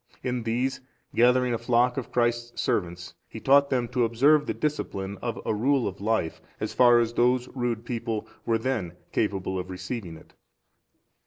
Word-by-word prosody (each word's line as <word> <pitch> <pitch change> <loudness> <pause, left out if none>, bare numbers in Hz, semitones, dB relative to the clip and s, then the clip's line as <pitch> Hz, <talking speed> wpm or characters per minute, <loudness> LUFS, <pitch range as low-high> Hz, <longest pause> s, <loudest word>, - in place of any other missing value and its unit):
In 125 -1 -1
these, 120 +4 -1 0.3
gathering 125 +1 +4
a 115 - -1
flock 120 +1 +2
of 135 - -5
Christ's 120 0 0
servants, 90 -1 -2 0.2
he - - -8
taught 140 +1 +4
them 125 -3 0
to 125 -1 +1
observe 140 +7 +4
the - - 0
discipline 100 -10 -3
of 120 -2 -3
a - - +1
rule 130 +4 +2
of 100 0 -6
life, 110 -6 -1 0.2
as - - -3
far 120 -1 +6
as 115 -1 +1
those 125 +1 +2
rude 120 -3 -3
people 115 -3 -3 0.2
were 115 -1 +1
then 115 -8 -2 0.2
capable 95 -3 -1
of 90 +1 -6
receiving 95 -1 -6
it. - - -18
120 Hz, 170 wpm, -26 LUFS, 105-125 Hz, 0.3 s, far